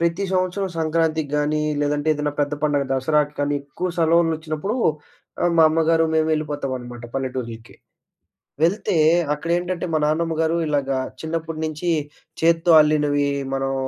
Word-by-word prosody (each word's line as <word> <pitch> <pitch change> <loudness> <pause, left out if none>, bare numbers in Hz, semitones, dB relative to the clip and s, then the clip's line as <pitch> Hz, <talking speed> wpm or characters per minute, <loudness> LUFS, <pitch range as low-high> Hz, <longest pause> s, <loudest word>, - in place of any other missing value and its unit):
ప్రతి 170 +4 0
సంవత్సరం 185 +1 0
సంక్రాంతికి 160 -2 0
గానీ, 150 +1 0 0.2
లేదంటే 145 +1 0
ఏదన్నా 150 0 -2
పెద్ద 145 0 0
పండగ 145 -2 +1
దసరాకి 150 +2 +1
కానీ, 145 0 0
ఎక్కువ 170 +6 -4
సెలవులొచ్చినప్పుడు, 165 +3 +1 0.7
ఆహ్, 175 - +2
మా 160 - +8
అమ్మగారు 165 +1 +2
మేము 160 0 +2
ఎళ్ళిపోతావనమాట 130 -5 -4
పల్లెటూర్లకి. 125 -4 -5 0.9
వెళ్తే 180 +3 +1 0.4
అక్కడేంటంటే, 175 +3 -2
మా - - +3
నాన్నమ్మ 165 +1 0
గారు 160 +1 +1
ఇలాగా 135 -2 0 0.2
చిన్నప్పుడు 160 0 -4
నించి 155 +3 -3 0.5
చేత్తో 165 +1 +3
అల్లినవీ, 145 -1 +2 0.3
మనం 135 0 -1
155 Hz, 125 wpm, -22 LUFS, 145-165 Hz, 0.9 s, మా